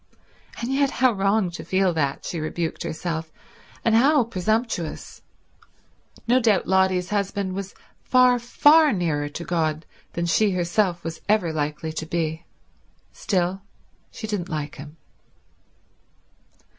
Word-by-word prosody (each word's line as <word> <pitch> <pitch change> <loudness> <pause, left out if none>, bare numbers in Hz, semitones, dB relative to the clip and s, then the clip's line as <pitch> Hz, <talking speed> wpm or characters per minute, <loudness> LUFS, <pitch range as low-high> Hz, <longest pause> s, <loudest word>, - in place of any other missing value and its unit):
And 240 +3 -2
yet 275 0 +2
how 255 -1 +3
wrong 195 -2 +1
to 170 - -7
feel 190 -1 +1
that, 140 -4 -1
she 170 - -4
rebuked 160 +1 -3
herself, 160 0 -4 0.5
and 230 - +3
how 270 +4 +5
presumptuous. 215 -4 -2 1.1
No 250 +2 +4
doubt 220 -5 +2
Lotty's 190 -1 +2
husband 200 -2 -1
was 195 0 -6 0.3
far, 250 -1 +4
far 295 +6 +5
nearer 155 -6 -1
to 160 +4 -7
God 160 -2 -1 0.3
than 170 - -2
she 210 +5 +3
herself 175 0 0
was 165 -1 -6
ever 205 -6 +2
likely 150 +1 -3
to 160 0 -5
be. 160 -1 -2 0.7
Still, 185 0 -1 0.5
she 220 - -8
didn't 205 -5 -3
like 150 -2 -4
him. 150 +3 -11
185 Hz, 130 wpm, -24 LUFS, 160-220 Hz, 1.1 s, how